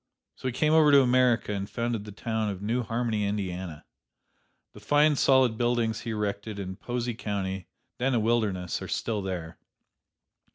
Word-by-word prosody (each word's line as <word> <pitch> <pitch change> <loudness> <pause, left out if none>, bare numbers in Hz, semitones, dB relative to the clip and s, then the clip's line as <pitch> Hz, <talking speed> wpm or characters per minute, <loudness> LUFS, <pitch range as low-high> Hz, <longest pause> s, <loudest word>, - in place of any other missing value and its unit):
So - - -6
he - - 0
came 150 +5 +1
over 155 -2 +6
to 140 -1 +7
America 125 -4 +3
and 100 0 -4
founded 115 -3 -2
the 105 - -8
town 110 +1 -2
of 100 -2 -4
New 115 +5 -1
Harmony, 115 -2 -1
Indiana. 95 -5 -3 0.9
The - - -12
fine 150 +1 +3
solid 130 -5 +3
buildings 120 -2 +1
he - - -6
erected 105 -1 -3
in 95 -1 -5
Posey 120 0 -3
County, 95 -4 -4 0.3
then 130 +1 +1
a - - +3
wilderness, 105 -6 0
are - - -5
still 110 -3 -2
there. 90 -4 -5
110 Hz, 165 wpm, -27 LUFS, 100-120 Hz, 0.9 s, to